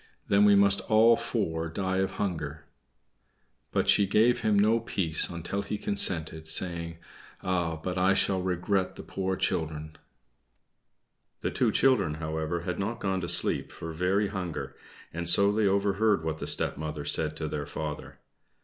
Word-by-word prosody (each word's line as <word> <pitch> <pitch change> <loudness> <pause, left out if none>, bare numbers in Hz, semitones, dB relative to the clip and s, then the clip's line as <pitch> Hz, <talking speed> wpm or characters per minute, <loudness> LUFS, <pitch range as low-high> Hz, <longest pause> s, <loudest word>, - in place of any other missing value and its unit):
"Then 100 +1 +5
we 100 -1 +6
must 100 0 +4
all 115 +1 +6
four 85 -9 -2
die 95 +3 -2
of 95 0 0
hunger." 80 -6 -4 1.1
But - - 0
she 100 - +4
gave 115 +5 +3
him 110 -2 +2
no 110 +3 +4
peace 85 -8 0
until 85 +3 -4
he 100 +1 -4
consented, 80 -6 +1
saying, 85 0 -1 0.5
"Ah, 90 -3 -1
but 90 +3 -4
I 95 +1 +3
shall 95 -1 +1
regret 95 +1 -1
the - - -9
poor 95 -1 -3
children." 80 -3 -2 1.5
The - - -2
two - - +1
children, 130 - +2
however, 80 +2 -3
had 90 +2 -4
not 110 +4 -3
gone 95 -1 -1
to 85 - -4
sleep - - +1
for 80 -1 -7
very 95 +5 +1
hunger, 90 -5 -5 0.4
and 85 +1 -2
so 100 +3 +4
they 105 0 +1
overheard 100 -1 +2
what 80 -1 -3
the - - -5
stepmother 75 0 -3
said 80 -1 0
to 80 - -3
their 75 -1 -4
father. 75 -1 -6
90 Hz, 160 wpm, -28 LUFS, 80-100 Hz, 1.5 s, we